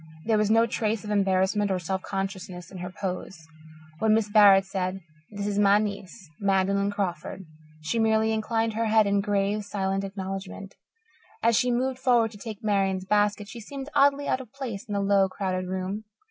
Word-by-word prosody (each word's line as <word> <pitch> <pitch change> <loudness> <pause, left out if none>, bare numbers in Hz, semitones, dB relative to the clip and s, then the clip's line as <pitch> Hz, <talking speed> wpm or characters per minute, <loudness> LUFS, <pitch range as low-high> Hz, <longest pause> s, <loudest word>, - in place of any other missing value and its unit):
There 220 -1 +2
was 210 -1 +1
no 225 +1 +5
trace 225 -2 -1
of 210 - -5
embarrassment 195 +1 +2
or 190 - +1
self 190 +2 -3
consciousness 190 -2 -5
in 190 - -8
her 180 +1 -5
pose. 180 -3 -6 0.5
When 215 +1 +4
Mrs. 210 -2 -1
Barrett 200 -3 +7
said, 190 0 -3 0.3
"This 205 -1 -5
is 205 0 -1
my 200 0 +5
niece, 200 -2 -5
Magdalen 200 0 +1
Crawford," 190 -1 -4 0.4
she 165 +10 -1
merely 220 0 +2
inclined 225 +1 0
her 230 +1 -1
head 220 0 +4
in 200 0 +2
grave, 205 +1 0
silent 195 -1 -2
acknowledgement. 195 0 -6 0.7
As 230 0 +4
she 250 - +2
moved 255 +1 0
forward 240 -4 +3
to 205 - -13
take 220 -2 -8
Marian's 195 -3 +1
basket, 205 +1 +1
she 235 +3 -9
seemed 270 +5 -8
oddly 285 0 +3
out 260 - 0
of 245 -4 -13
place 245 -6 -6
in 205 -3 -4
the 200 - 0
low, 195 -1 +3
crowded 185 -1 -3
room. 190 +3 -4
205 Hz, 185 wpm, -26 LUFS, 195-220 Hz, 0.7 s, Barrett